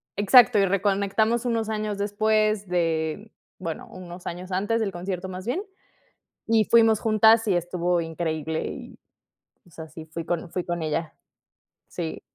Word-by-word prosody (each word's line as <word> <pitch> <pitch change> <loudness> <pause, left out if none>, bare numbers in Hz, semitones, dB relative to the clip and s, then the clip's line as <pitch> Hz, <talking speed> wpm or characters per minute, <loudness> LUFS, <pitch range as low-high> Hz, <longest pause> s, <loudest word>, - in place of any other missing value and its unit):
Exacto. 220 +3 +6
Y 195 - +4
reconectamos 200 +4 +1
unos 230 -2 -1
años 215 -1 -2
después 215 0 +1
de 170 +3 -1 0.3
bueno, 165 -4 -5
unos 180 -1 -10
años 180 +2 -6
antes 205 +5 0
del 205 -3 -1
concierto, 185 +1 -5
más 185 0 -7
bien. 295 - -2 0.8
Y 225 -1 +3
fuimos 225 -1 +5
juntas 220 +1 +4
y 195 - +3
estuvo 175 0 0
increíble. 160 -1 -3
Y, - - -9 0.7
o - - -21
sea, 160 0 -9
sí, 160 0 -10
fui 165 +1 -6
con 170 0 -3
fui 180 - -2
con 175 -1 -3
ella. 155 +1 -2 0.7
Sí. 165 -3 -5
190 Hz, 150 wpm, -25 LUFS, 170-215 Hz, 0.8 s, Exacto